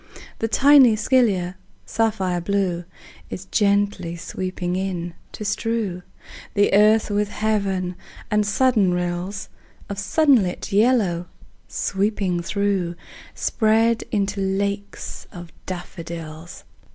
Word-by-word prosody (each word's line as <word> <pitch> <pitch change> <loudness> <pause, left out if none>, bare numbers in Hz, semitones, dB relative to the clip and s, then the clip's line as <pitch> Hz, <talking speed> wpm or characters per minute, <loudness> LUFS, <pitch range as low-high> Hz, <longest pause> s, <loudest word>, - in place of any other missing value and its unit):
The 225 - 0
tiny 270 -1 +6
scilla, 205 -7 +2 0.3
sapphire 195 -6 0
blue, 180 -2 -1 0.4
Is 190 - -6
gently 200 -4 +1
sweeping 180 +1 -4
in, 180 -3 -3 0.2
to 210 - -6
strew 210 -3 -1 0.5
The 205 -1 +3
earth 210 +2 +5
with 205 0 +1
heaven; 195 -4 -1 0.4
and 210 0 +3
sudden 205 -3 +2
rills 180 +2 -3 0.4
Of 200 0 -4
sunlit 255 - +2
yellow, 200 -5 +2 0.4
sweeping 195 -3 -1
through, 190 -2 -1 0.4
Spread 225 +1 +2
into 200 -1 0
lakes 200 +1 -3
of 175 -2 -10 0.2
daffodils. 170 -2 -7
200 Hz, 100 wpm, -22 LUFS, 180-215 Hz, 0.5 s, tiny